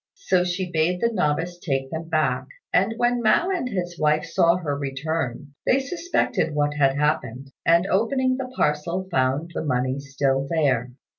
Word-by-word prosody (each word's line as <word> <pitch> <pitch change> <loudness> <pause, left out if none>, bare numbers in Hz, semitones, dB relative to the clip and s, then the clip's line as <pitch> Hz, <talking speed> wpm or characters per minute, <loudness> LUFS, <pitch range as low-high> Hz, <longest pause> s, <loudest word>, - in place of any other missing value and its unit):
So 190 - +2
she 180 0 -2
bade 165 +2 +1
the 235 +3 +1
novice 175 -1 -1
take 135 -5 -2
them 160 0 -5
back; 130 -5 0 0.3
and 195 +5 +2
when 240 0 +1
Mao 340 +11 +3
and 340 -10 -1
his 175 -4 -4
wife 150 0 +2
saw 165 +1 +3
her 160 -6 -2
return, 140 0 -3
they 260 - +3
suspected 270 - -1
what 145 0 +1
had 135 -2 +2
happened, 140 -3 -1 0.2
and 170 +2 +5
opening 255 +6 +1
the 255 -1 -5
parcel 170 +5 0
found 135 +4 0
the - - -3
money 130 -2 0
still 135 -1 -1
there. 135 -7 +1
160 Hz, 165 wpm, -24 LUFS, 140-185 Hz, 0.3 s, and